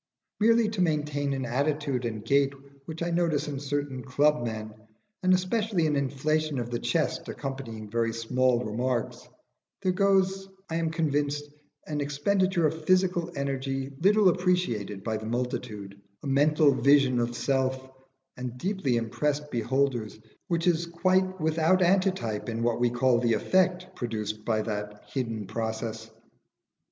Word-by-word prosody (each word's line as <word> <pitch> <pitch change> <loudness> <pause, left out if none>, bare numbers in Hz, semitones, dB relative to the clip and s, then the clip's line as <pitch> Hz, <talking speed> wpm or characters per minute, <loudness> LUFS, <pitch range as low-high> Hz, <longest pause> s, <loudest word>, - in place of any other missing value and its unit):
Merely 230 +1 +4
to 215 -3 -2
maintain 150 -4 0
an 135 -1 -2
attitude 140 0 -1
and 110 -2 -4
gait 140 +2 +3 0.3
which 160 0 -5
I 170 - -1
notice 165 -4 +1
in 140 -2 -4
certain 140 -2 -3
club 145 +2 +2
men, 110 -2 -4 0.5
and 185 - +3
especially 185 0 +1
an 150 -1 +1
inflation 145 +2 0
of 120 -1 -3
the 120 - -1
chest - - -1
accompanying 120 -6 -6
very 115 +1 0
small 125 +2 +1
remarks, 120 +2 -2 0.5
there 185 - +3
goes, 195 0 +2 0.2
I 165 - 0
am 165 -1 0
convinced, 145 -3 0 0.4
an 150 -1 -3
expenditure 170 +5 +1
of 160 +1 -1
psychical 185 -2 +2
energy 135 -1 -2
little 200 +1 +5
appreciated 170 - 0
by 110 -1 -1
the 110 0 -7
multitude 110 -4 -4 0.2
a - - -4
mental 145 +2 +4
vision 135 -2 +4
of 120 0 -1
Self 130 -1 0 0.5
and 125 -1 -6
deeply 185 - 0
impressed 150 +6 -1
beholders 120 -2 0 0.3
which 170 -1 0
is 170 -1 +2
quite 185 +2 +1
without 160 +3 +3
antitype 175 - +1
in 115 0 -2
what 120 0 +1
we 120 0 +3
call 120 0 +2
the 120 -1 +2
effect 180 - +1
produced 110 -3 -4
by 110 -2 +1
that 105 -1 -5
hidden 115 -5 -2
process. 110 +1 -4
140 Hz, 145 wpm, -27 LUFS, 120-170 Hz, 0.5 s, little